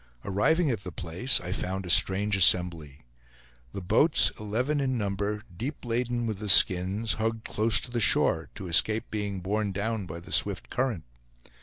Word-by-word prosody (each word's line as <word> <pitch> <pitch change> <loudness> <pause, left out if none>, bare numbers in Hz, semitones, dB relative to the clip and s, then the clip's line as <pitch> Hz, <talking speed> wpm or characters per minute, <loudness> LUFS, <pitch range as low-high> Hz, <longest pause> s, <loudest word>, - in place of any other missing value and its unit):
Arriving 140 - +1
at 110 -4 -4
the 90 - -7
place, 85 - -1
I 90 +1 -7
found 95 0 -3
a - - -8
strange 100 +3 +3
assembly. 85 -5 +2 0.7
The 95 - -7
boats, 150 - +3
eleven 120 +8 -2
in 130 -2 -1
number, 105 0 -3
deep 130 - -6
laden 120 0 -2
with 110 -4 -4
the 105 -1 -5
skins, 95 +3 +4
hugged 110 0 -3
close 110 +1 +2
to 125 - -7
the 120 - -2
shore, 80 -6 +2
to 95 - -8
escape 110 +6 +1
being 100 -3 -4
borne 100 +2 -2
down 100 0 -3
by 85 +1 -8
the 85 - -14
swift - - 0
current. 125 -10 -2
105 Hz, 170 wpm, -27 LUFS, 95-115 Hz, 0.7 s, skins